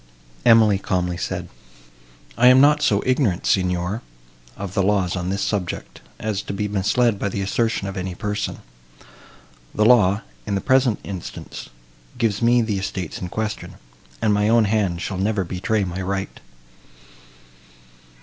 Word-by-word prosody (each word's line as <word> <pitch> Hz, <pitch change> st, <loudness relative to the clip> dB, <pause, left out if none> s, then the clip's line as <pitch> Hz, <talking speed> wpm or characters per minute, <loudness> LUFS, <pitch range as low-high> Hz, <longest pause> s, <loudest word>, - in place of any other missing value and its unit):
Emily 110 Hz, -3 st, +6 dB
calmly 90 Hz, -2 st, -1 dB
said, 85 Hz, -, -4 dB, 0.9 s
"I 125 Hz, +2 st, +5 dB
am 125 Hz, +1 st, +8 dB
not 150 Hz, +2 st, +5 dB
so 100 Hz, -7 st, +2 dB
ignorant, 125 Hz, -8 st, +1 dB
Signor, 90 Hz, +3 st, 0 dB, 0.6 s
of 100 Hz, -2 st, -6 dB
the 100 Hz, -, +1 dB
laws 95 Hz, -2 st, +1 dB
on 90 Hz, 0 st, -3 dB
this 100 Hz, +1 st, -1 dB
subject, 95 Hz, -5 st, -3 dB, 0.2 s
as 110 Hz, -2 st, -2 dB
to 100 Hz, -, -6 dB
be 105 Hz, +1 st, -2 dB
misled 105 Hz, +2 st, +1 dB
by 100 Hz, -, -1 dB
the 100 Hz, -, -3 dB
assertion 110 Hz, +1 st, 0 dB
of 95 Hz, -, -5 dB
any 90 Hz, -1 st, -4 dB
person. 105 Hz, +2 st, -3 dB, 1.1 s
The 105 Hz, -, +3 dB
law, 105 Hz, -4 st, +5 dB, 0.2 s
in 100 Hz, -, 0 dB
the -, -, 0 dB
present 130 Hz, -1 st, +3 dB
instance, 95 Hz, -4 st, -8 dB, 0.5 s
gives 115 Hz, -3 st, 0 dB
me 120 Hz, +1 st, +4 dB
the 105 Hz, -3 st, -1 dB
estates 95 Hz, -3 st, -5 dB
in 90 Hz, -, -4 dB
question, 110 Hz, +2 st, -4 dB, 0.5 s
and 110 Hz, -2 st, +3 dB
my 105 Hz, +1 st, +2 dB
own 115 Hz, -1 st, +4 dB
hand 100 Hz, -5 st, 0 dB
shall 95 Hz, -2 st, -4 dB
never 100 Hz, 0 st, 0 dB
betray 100 Hz, +4 st, -1 dB
my 90 Hz, 0 st, -4 dB
right." 95 Hz, +1 st, -3 dB
100 Hz, 150 wpm, -22 LUFS, 95-110 Hz, 1.1 s, am